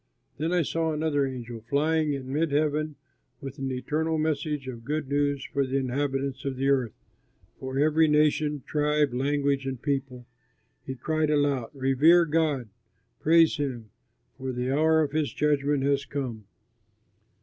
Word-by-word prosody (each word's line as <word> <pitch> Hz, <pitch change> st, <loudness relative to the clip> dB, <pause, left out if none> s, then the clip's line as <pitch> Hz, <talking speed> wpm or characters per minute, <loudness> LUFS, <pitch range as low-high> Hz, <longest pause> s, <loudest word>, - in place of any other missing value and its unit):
Then 160 Hz, +3 st, -1 dB
I 180 Hz, -2 st, +2 dB
saw 165 Hz, +2 st, -1 dB
another 150 Hz, -2 st, 0 dB
angel 120 Hz, -3 st, -7 dB
flying 155 Hz, +1 st, +1 dB
in 135 Hz, -1 st, -5 dB
mid 155 Hz, +1 st, 0 dB
heaven 150 Hz, +1 st, 0 dB, 0.4 s
with 135 Hz, +1 st, -8 dB
an 135 Hz, 0 st, -2 dB
eternal 155 Hz, +5 st, -1 dB
message 150 Hz, -2 st, -1 dB
of 120 Hz, -3 st, -7 dB
good 150 Hz, +2 st, -2 dB
news 145 Hz, -1 st, 0 dB
for 140 Hz, -, -1 dB
the 135 Hz, +1 st, -1 dB
inhabitants 135 Hz, 0 st, -2 dB
of 135 Hz, -1 st, -3 dB
the 135 Hz, +1 st, +1 dB
earth, 130 Hz, -5 st, +1 dB, 0.6 s
for 130 Hz, 0 st, -5 dB
every 155 Hz, +2 st, +4 dB
nation, 150 Hz, -1 st, +2 dB
tribe, 150 Hz, -2 st, +1 dB
language, 140 Hz, +1 st, 0 dB
and 130 Hz, -2 st, -4 dB
people. 135 Hz, -3 st, -3 dB, 0.6 s
He 130 Hz, -, -4 dB
cried 155 Hz, +4 st, -1 dB
aloud, 145 Hz, -5 st, +1 dB
"Revere 140 Hz, +6 st, +4 dB
God, 150 Hz, -7 st, 0 dB, 0.5 s
praise 165 Hz, 0 st, +4 dB
him, 125 Hz, -7 st, -4 dB, 0.5 s
for 130 Hz, 0 st, -3 dB
the 125 Hz, +1 st, -2 dB
hour 160 Hz, +3 st, +3 dB
of 145 Hz, -, -3 dB
his 150 Hz, -1 st, -1 dB
judgment 145 Hz, -2 st, +1 dB
has 140 Hz, 0 st, +1 dB
come. 125 Hz, -7 st, -5 dB
145 Hz, 150 wpm, -27 LUFS, 130-155 Hz, 0.6 s, every